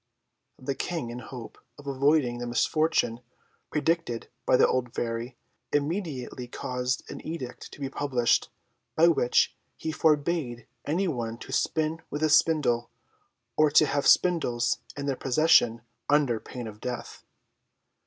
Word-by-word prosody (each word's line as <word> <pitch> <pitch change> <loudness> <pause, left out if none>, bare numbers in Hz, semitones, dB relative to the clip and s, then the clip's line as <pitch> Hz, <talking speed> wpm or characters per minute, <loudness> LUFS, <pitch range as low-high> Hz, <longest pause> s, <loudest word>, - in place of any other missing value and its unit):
The 135 +2 -3
King, 140 -4 -3
in 120 - -6
hope 125 -1 -9 0.2
of 145 - -13
avoiding 140 -2 +2
the 120 - -4
misfortune 120 -1 +1 0.5
predicted 160 -6 -1 0.2
by - - +5
the - - +6
old 125 -1 -1
Fairy, 120 +1 -3 0.3
immediately 145 -5 -2
caused 125 +1 -2
an - - -8
edict 145 -7 -6
to - - -12
be 140 - -2
published, 130 -3 +1 0.5
by 165 +2 +6
which 125 -7 +3 0.2
he 160 - -3
forbade 150 -6 +1 0.2
any 180 +6 0
one 115 -7 -3
to 130 - -10
spin 160 +3 0
with 150 +2 -3
a 155 - +3
spindle, 150 -6 +3 0.7
or 155 0 +5
to 150 +1 +6
have 145 -1 0
spindles 155 -10 +3 0.2
in 140 - -3
their 140 -2 0
possession, 125 -4 +3 0.3
under 140 -6 +3
pain 125 +2 -8
of 105 -1 -9
death. 125 -1 -6
135 Hz, 140 wpm, -27 LUFS, 120-155 Hz, 0.7 s, the